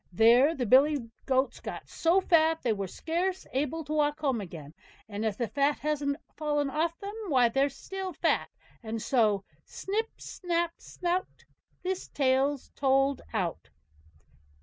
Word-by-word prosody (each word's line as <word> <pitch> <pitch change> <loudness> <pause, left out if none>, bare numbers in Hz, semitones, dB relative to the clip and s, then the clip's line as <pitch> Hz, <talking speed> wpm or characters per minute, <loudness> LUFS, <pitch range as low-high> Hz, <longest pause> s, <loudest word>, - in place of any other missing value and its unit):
There 240 - +5
the 250 - -1
billy 265 0 +4 0.2
goats 265 0 +1
got - - -7
so 345 +4 +2
fat 325 -2 +3
they 235 - +2
were 200 -2 -3
scarce 360 - -2
able 295 +4 -1
to 305 +1 -5
walk 295 0 +1
home 270 -7 0
again; 160 -6 -9 0.3
and 210 0 -4
if 215 -2 -1
the 235 - -1
fat 285 +4 +1
hasn't 285 -1 -1 0.2
fallen 295 -2 0
off 330 +3 0
them, 400 +1 -6
why 255 -7 +4
they're 270 +4 +2
still 380 +7 -6
fat; - - 0 0.3
and 225 -1 -4
so: 215 -5 +2 0.2
Snip, 440 +3 -3
snap, 345 -1 -2
snout, 360 +1 -3 0.4
This 375 0 -2
tale's 270 0 +1
told 270 0 +2
out. 185 -7 -2
280 Hz, 150 wpm, -29 LUFS, 240-325 Hz, 0.4 s, There